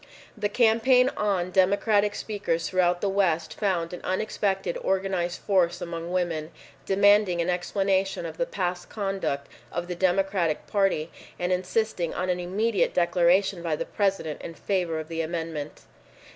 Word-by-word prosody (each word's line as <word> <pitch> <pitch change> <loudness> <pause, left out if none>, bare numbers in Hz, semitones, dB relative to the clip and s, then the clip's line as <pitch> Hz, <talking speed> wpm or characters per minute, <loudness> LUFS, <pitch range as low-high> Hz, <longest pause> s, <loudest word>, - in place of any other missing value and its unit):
The 210 -2 -1
campaign 250 +3 +4
on, 190 -4 0
Democratic 205 +2 +3
speakers 200 -6 -2
throughout 180 -1 +1
the 205 - +1
West 185 -5 +1
found 180 -5 -1
an 180 - -7
unexpected 195 -1 -1
organized 190 -2 -1
force 175 -3 +2
among 170 -1 -5
women, 170 -4 -1 0.4
demanding 200 -2 +4
an 170 +1 +1
explanation 190 +1 0
of 160 -1 -7
the 255 - 0
past 180 -2 -3
conduct 195 -9 -2 0.3
of 175 +1 -3
the 180 - -3
Democratic 185 -2 +1
Party 195 -6 0 0.3
and 180 +1 -1
insisting 185 -1 -1
on 185 0 0
an 180 - -1
immediate 200 +4 0
declaration 180 +2 +3
by 165 -2 -1
the - - -4
President 195 -7 -1
in 165 - -7
favor 175 -5 -1
of 155 - -6
the 165 0 -3
amendment. 160 -2 -4
185 Hz, 145 wpm, -26 LUFS, 170-200 Hz, 0.4 s, campaign